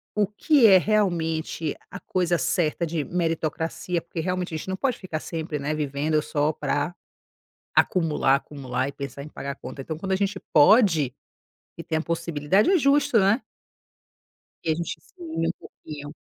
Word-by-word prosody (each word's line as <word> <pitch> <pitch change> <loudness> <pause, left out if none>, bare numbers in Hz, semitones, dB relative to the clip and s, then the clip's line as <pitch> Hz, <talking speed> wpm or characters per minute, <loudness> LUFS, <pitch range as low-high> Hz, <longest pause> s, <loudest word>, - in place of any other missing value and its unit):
o 210 -2 +2
que 245 +4 +4
é 190 -2 +8
realmente 165 -6 0
a - - -8
coisa 175 -2 0
certa 170 -1 0
de 160 -2 -2
meritocracia, 165 +1 -2
porque 170 0 -7
realmente 180 0 -2
a - - -1
gente 170 - -7
não 190 - -1
pode 255 +2 0
ficar 170 -5 -4
sempre, 160 -2 -4
né, 150 +2 -2
vivendo 150 +1 0
só 150 0 0
pra 150 +4 -1 0.8
acumular, 155 -6 +3
acumular 135 -2 -3
e - - -4
pensar 140 -1 -6
em - - -9
pagar 140 -1 -6
conta. 135 - -8
Então 155 +3 -5
quando 190 +3 -2
a - - +4
gente 195 0 -1
pode 155 - +5 0.6
e 165 - -6
tem 160 -1 -1
a - - -2
possibilidade, 170 - +1
é 380 - +5
justo, 275 -5 +3
né. 200 +6 +3 1.2
Que 160 - 0
a - - +1
gente 170 +1 -4
se - - -26
mime 165 0 -2
um 170 - +2
pouquinho. 145 -1 -10
165 Hz, 175 wpm, -25 LUFS, 150-190 Hz, 1.2 s, é